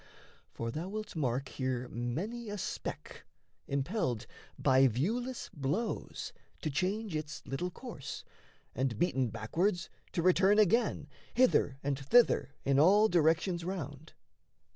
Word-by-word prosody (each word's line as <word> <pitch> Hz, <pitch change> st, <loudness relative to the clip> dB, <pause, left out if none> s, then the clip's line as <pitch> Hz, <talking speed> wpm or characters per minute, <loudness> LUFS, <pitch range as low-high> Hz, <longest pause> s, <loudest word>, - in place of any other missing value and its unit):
For 115 Hz, 0 st, -4 dB
thou 165 Hz, +8 st, -4 dB
wilt 215 Hz, -1 st, -5 dB
mark 130 Hz, -3 st, 0 dB
here 130 Hz, -2 st, -2 dB
many 195 Hz, -, -3 dB
a 205 Hz, -, -4 dB
speck, -, -, -5 dB, 0.4 s
impelled 140 Hz, -, -1 dB, 0.3 s
By 130 Hz, 0 st, +5 dB
viewless 230 Hz, -, -2 dB
blows, 150 Hz, -, -3 dB, 0.3 s
to 155 Hz, -, -1 dB
change 190 Hz, +5 st, -1 dB
its 155 Hz, -1 st, -5 dB
little 145 Hz, +7 st, -2 dB
course, 225 Hz, -, -7 dB, 0.5 s
And 125 Hz, -3 st, -1 dB
beaten 130 Hz, -4 st, +1 dB
backwards 170 Hz, -, -1 dB, 0.2 s
to 170 Hz, -, 0 dB
return 190 Hz, +3 st, +5 dB
again, 215 Hz, -5 st, +3 dB, 0.3 s
Hither 240 Hz, -, +4 dB
and 140 Hz, -1 st, -1 dB
thither 145 Hz, -, +4 dB
in 140 Hz, 0 st, +3 dB
all 205 Hz, +7 st, +6 dB
directions 170 Hz, +1 st, +2 dB
round. 160 Hz, -5 st, -5 dB
160 Hz, 120 wpm, -32 LUFS, 135-205 Hz, 0.5 s, all